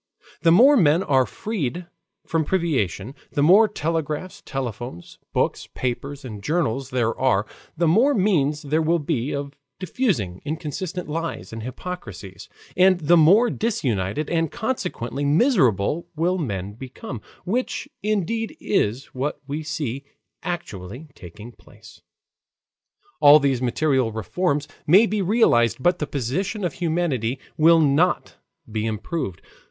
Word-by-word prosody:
The 165 0 +4
more 255 - +7
men 170 - +4
are 130 -3 +2
freed 180 - -4 0.4
from 165 -1 0
privation; 135 - -1 0.2
the 145 - +1
more 195 +8 +7
telegraphs, 165 -2 -3
telephones, 120 -7 -6
books, - - -1
papers, 135 +3 -4
and 105 -5 -7
journals 135 - -1
there 120 -3 0
are; 125 -6 +2 0.3
the 170 0 +2
more 235 - +4
means 155 -8 +1
there 150 +3 +1
will 165 +2 +2
be 140 -4 -2
of 140 0 -4 0.2
diffusing 160 - -1
inconsistent 160 +4 -4
lies 165 -5 -4
and 115 - -6
hypocrisies, 120 - -8 0.3
and 185 0 +5
the 160 +3 +4
more 195 +9 +5
disunited 135 - -1
and 165 -2 0
consequently 180 - -3
miserable 150 - +2
will 175 +4 0
men 100 - -3
become, 125 -1 -8 0.2
which 250 +7 -2
indeed 220 - -1
is 130 - 0
what 135 +3 -3
we 145 +3 -4
see 150 -4 -4 0.4
actually 125 - -6
taking 105 +5 -11
place. - - -18 1.2
All 145 +1 +9
these 135 -4 0
material 130 -1 +1
reforms 145 - -1 0.2
may 190 +9 +7
be 215 -2 -1
realized, 180 - +3
but 175 +6 +2
the 150 - -2
position 180 - -2
of 170 - -2
humanity 155 -8 -1 0.2
will 165 +1 +6
not 160 +4 +2 0.3
be 110 0 -1
improved. 110 - -4
150 Hz, 130 wpm, -23 LUFS, 125-180 Hz, 1.2 s, All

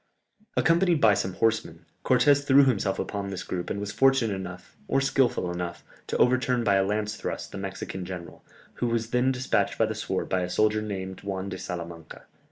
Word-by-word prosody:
Accompanied 170 0 +3
by 110 -5 +6
some 95 -2 -1
horsemen, 110 -7 -1 0.2
Cortès 140 +2 +4
threw 140 0 +6
himself 100 -6 +1
upon 100 -1 -3
this 95 -2 -5
group 90 -1 -4
and 100 - -2
was 100 0 -4
fortunate 135 -3 +3
enough, 90 -1 -8
or - - +2
skilful 135 -9 +1
enough, 85 0 -5 0.2
to - - -1
overturn 125 -1 +2
by 100 -3 +3
a 95 0 +4
lance 105 +1 -1
thrust - - -5
the - - -6
Mexican 95 -1 -5
general, 90 -2 -8 0.4
who 120 - +2
was 115 -1 -1
then 125 +2 +3
despatched 130 0 0
by - - +3
the - - -2
sword - - -3
by 95 - 0
a 90 - -2
soldier 110 +3 +2
named 95 -3 -5
Juan 100 -1 -4
de 95 -1 -6
Salamanca. 85 -2 -7
100 Hz, 190 wpm, -27 LUFS, 95-125 Hz, 0.4 s, by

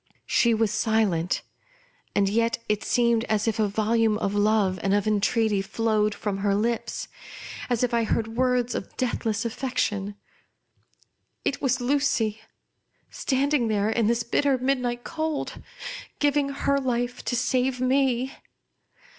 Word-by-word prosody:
She 235 -1 +3
was 220 -2 +1
silent, 205 -7 +1 0.7
and 200 -1 +3
yet 230 +3 +1
it 210 -1 0
seemed 235 -2 +2
as 215 0 0
if 225 0 0
a 215 - +3
volume 220 +1 +2
of 200 -2 -1
love 205 -3 +2
and 195 0 +2
of 205 - +1
entreaty 215 0 +2
flowed 215 0 0
from 200 -2 -3
her 200 0 +1
lips; 230 +3 -1 0.6
as 245 -1 +1
if 245 - 0
I 235 -1 +3
heard 220 0 0
words 250 -1 +1
of - - -6
death 250 -2 -1
less 220 +1 0
affection. 210 -5 -2 1.3
It 280 - -1
was 265 -1 +1
Lucy; 245 -5 +1 0.7
standing 270 -2 +1
there 210 0 +1
in 225 -2 +1
this 235 0 +1
bitter 270 +3 +2
midnight 250 -2 -1
cold 315 -2 -3 0.3
— - - -11
giving 290 -1 +2
her 280 0 0
life 245 -1 -2
to 245 - 0
save 250 +1 +1
me. 260 0 +1
230 Hz, 145 wpm, -25 LUFS, 210-255 Hz, 1.3 s, She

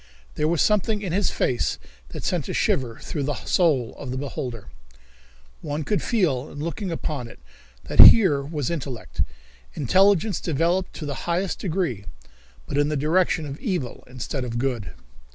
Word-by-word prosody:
There 150 - 0
was 165 -2 +2
something 210 0 +1
in 185 - -3
this 195 0 +2
face 125 -2 0 0.3
that - - -7
sent - - -1
a - - -3
shiver 120 -4 0
through 150 - -4
the 145 +1 -1
soul 145 -10 +2
of 135 - -6
the 130 - -3
beholder. 130 -5 -5 0.9
One 150 +1 -3
could 205 +5 0
feel 155 - 0
in - - -11
looking 170 +6 -4
upon 150 -6 -3
it - - -13 0.5
that - - -6
here 180 -11 +9
was 145 +1 -3
intellect, 125 - -4 0.5
intelligence 195 - +3
developed 170 +4 0
to 155 - -6
the 145 +3 -5
highest 180 +2 0
degree, 160 - -2 0.6
but 140 - -2
in 145 0 +2
the 150 - -1
direction 160 +2 +1
of 140 0 -7
evil 175 - -3
instead 130 +2 -4
of 120 -1 -4
good. 120 -5 -2
150 Hz, 165 wpm, -24 LUFS, 130-180 Hz, 0.9 s, here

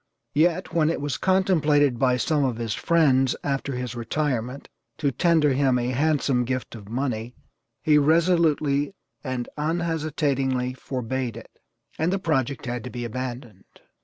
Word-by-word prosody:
Yet, 170 +4 +1
when 160 -2 +3
it 165 - -1
was 145 -1 -2
contemplated 155 -9 +2
by 125 -2 +3
some 150 +3 +1
of 125 -4 0
his 115 -2 -2
friends, 135 -6 +3
after 140 -1 -2
his 125 -1 -4
retirement, 125 +1 -2 0.3
to 145 -3 0
tender 155 +1 +3
him 130 -1 +2
a 120 0 -1
handsome 140 -2 +1
gift 130 +1 -3
of 105 -3 -10
money, 120 -1 -3 0.5
he 150 -2 +5
resolutely 155 -1 +2 0.3
and 130 -3 -3
unhesitatingly 150 -6 0
forbade 130 -2 -4
it, 115 - -11 0.5
and 160 +3 +1
the 195 - +1
project 140 -8 -1
had 120 -2 -3
to - - -5
be 120 -1 -5
abandoned. 120 -4 -6
135 Hz, 145 wpm, -25 LUFS, 125-155 Hz, 0.5 s, he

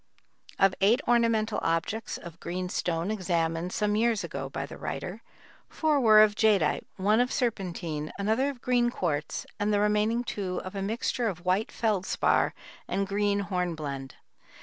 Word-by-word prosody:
Of 195 -1 +4
eight 220 +6 +5
ornamental 230 -2 +2
objects 165 +7 -1
of 170 0 -11
green 180 +1 -4
stone 170 +2 -1
examined 170 -3 -1
some 210 +1 0
years 225 -1 +2
ago - - -5
by - - -4
the - - -10
writer, - - -5 0.5
four 310 -2 +1
were 215 -4 +7
of 210 -1 +3
jadeite, 205 -7 +2
one 210 +4 +2
of 250 +1 +2
serpentine, 175 - -2
another 220 +7 +1
of 265 -4 -8
green 245 -1 +3
quartz, 160 -9 -2
and 205 +1 +1
the 205 - +3
remaining 210 +3 +2
two 190 -6 -3
of 185 - -6
a 195 - -4
mixture 230 +3 -1
of 180 -4 -5
white 190 +5 +1
feldspar 210 -5 +1 0.3
and 195 - 0
green 205 0 +1
hornblende. 160 -8 -3
205 Hz, 155 wpm, -28 LUFS, 180-225 Hz, 0.5 s, were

